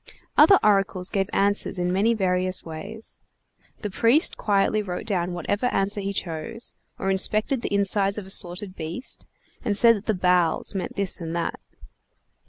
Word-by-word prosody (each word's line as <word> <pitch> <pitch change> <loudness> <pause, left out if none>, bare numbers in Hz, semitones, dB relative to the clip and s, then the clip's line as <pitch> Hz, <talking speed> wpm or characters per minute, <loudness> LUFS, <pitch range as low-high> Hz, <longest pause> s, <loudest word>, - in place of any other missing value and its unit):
Other 395 - +7
oracles 195 -3 +2
gave 195 -1 0
answers 200 -1 +1
in 180 0 -1
many 220 +5 +2
various 185 -2 0
ways. 165 +8 -7 0.6
The 210 - -4
priest 235 - +3
quietly 205 +1 +1
wrote 180 -3 -5
down 180 -4 -1
whatever 205 +7 -1
answer 200 -2 -1
he 200 0 -3
chose; 180 +5 -4 0.2
or 195 - -1
inspected 215 +6 +2
the - - -4
insides 200 0 +1
of 210 - -5
a 190 - -5
slaughtered 185 +1 +1
beast, 165 +10 -5 0.4
and 205 -3 +1
said 230 +1 +6
that 205 - -12
the 220 - +1
bowels 180 -1 +2
meant 190 -2 -4
this 195 -3 -1
and 165 0 -4
that. 170 -1 -2
195 Hz, 165 wpm, -24 LUFS, 180-210 Hz, 0.6 s, Other